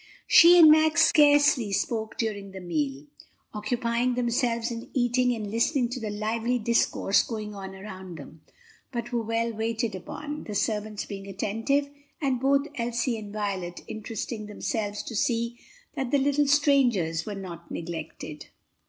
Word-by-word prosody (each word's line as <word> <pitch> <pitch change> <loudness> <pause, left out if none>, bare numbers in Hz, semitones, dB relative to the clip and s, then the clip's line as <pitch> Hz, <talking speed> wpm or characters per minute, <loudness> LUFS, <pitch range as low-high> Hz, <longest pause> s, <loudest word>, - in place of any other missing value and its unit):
She 350 +1 +8
and 320 -3 +9
Max 315 +1 +5
scarcely 290 -6 +5
spoke 220 +2 -2
during 200 -4 -3
the 190 - -7
meal, 150 -6 -3 0.5
occupying 235 +3 -1
themselves 240 -1 0
in 230 0 -7
eating 250 0 +2
and 210 -3 -5
listening 240 +2 +1
to 250 +1 -4
the 220 -2 -4
lively 225 +4 -1
discourse 230 -3 +2
going 215 -2 -5
on 190 -1 -8
around 190 -3 -9
them, 155 -1 -12 0.5
but 240 -1 -4
were 240 -1 0
well 230 +1 -1
waited 225 0 -2
upon, 295 +11 -7
the 210 - -6
servants 210 0 -1
being 195 -1 -8
attentive, 225 +8 -1 0.3
and 270 -4 0
both 275 +2 +2
Elsie 235 0 -1
and 210 -1 -9
Violet 195 -4 -3
interesting 215 0 -5
themselves 210 0 -3
to 230 - -7
see 235 -1 0 0.3
that 265 -2 -3
the 285 - +3
little 285 +1 +2
strangers 250 - +2
were 210 - -4
not 175 -3 -8
neglected. 160 -2 -7
230 Hz, 150 wpm, -27 LUFS, 205-250 Hz, 0.5 s, and